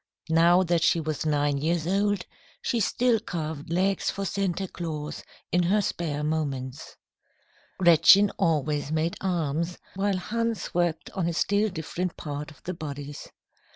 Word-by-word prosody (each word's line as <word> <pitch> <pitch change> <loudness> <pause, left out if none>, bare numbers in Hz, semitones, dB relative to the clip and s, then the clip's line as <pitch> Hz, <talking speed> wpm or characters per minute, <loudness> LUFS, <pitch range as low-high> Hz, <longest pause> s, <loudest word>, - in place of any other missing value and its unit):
Now 170 +3 +5
that 170 -2 +1
she 170 - +3
was 155 -1 -2
nine 145 -1 +1
years 160 +2 0
old, 200 +1 +1 0.4
she 235 - 0
still 235 +2 +2
carved 155 -5 -5
legs 190 +2 +1
for 195 - -3
Santa 195 0 -1
Claus 155 -4 -5 0.3
in 180 - +3
her 190 +5 +3
spare 160 -6 -2
moments. 140 -4 -3 0.8
Gretchen 190 +3 +7
always 150 -2 +1
made 160 +2 0
arms, 170 -2 -1 0.2
while 195 0 +1
Hans 230 +3 -2
worked 175 -2 0
on 185 -4 -1
a 170 - -1
still 205 +5 +2
different 175 +1 -4
part 145 -1 -5
of 155 - -17
the 180 - -3
bodies. 145 -3 -7
170 Hz, 145 wpm, -27 LUFS, 155-190 Hz, 0.8 s, Gretchen